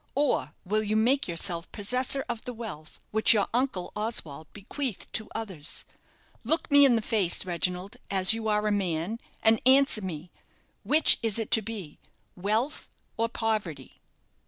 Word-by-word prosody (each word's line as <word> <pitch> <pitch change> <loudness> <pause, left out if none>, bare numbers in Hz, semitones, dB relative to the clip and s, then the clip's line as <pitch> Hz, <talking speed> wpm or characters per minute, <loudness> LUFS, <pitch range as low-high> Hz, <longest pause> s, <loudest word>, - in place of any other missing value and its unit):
or 285 +1 0
will 215 +3 +1
you 215 0 -1
make 250 +6 +2
yourself 170 0 -3
possessor 250 +6 0
of 235 -2 -4
the 250 - -7
wealth 200 -10 -8
which 220 +1 +5
your 205 - +2
uncle 245 -7 -1
Oswald 170 -9 -4
bequeathed 225 +3 -4
to 220 - -1
others? 190 -9 -3 0.6
Look 320 0 +1
me 285 0 +8
in 255 -3 +5
the 225 - 0
face, 200 -8 +2
Reginald, 180 +2 -2
as 190 +1 +3
you 225 -1 -3
are 210 0 +1
a 210 - +1
man, 190 +1 -1 0.2
and 220 0 +4
answer 265 -3 +4
me, 175 -2 -6 0.5
Which 310 +2 +4
is 225 -2 +1
it 225 - -3
to 220 - +4
be 205 -8 -7 0.4
wealth 215 +10 -2 0.3
or 230 0 0
poverty?" 210 - -3
215 Hz, 155 wpm, -27 LUFS, 185-235 Hz, 0.6 s, me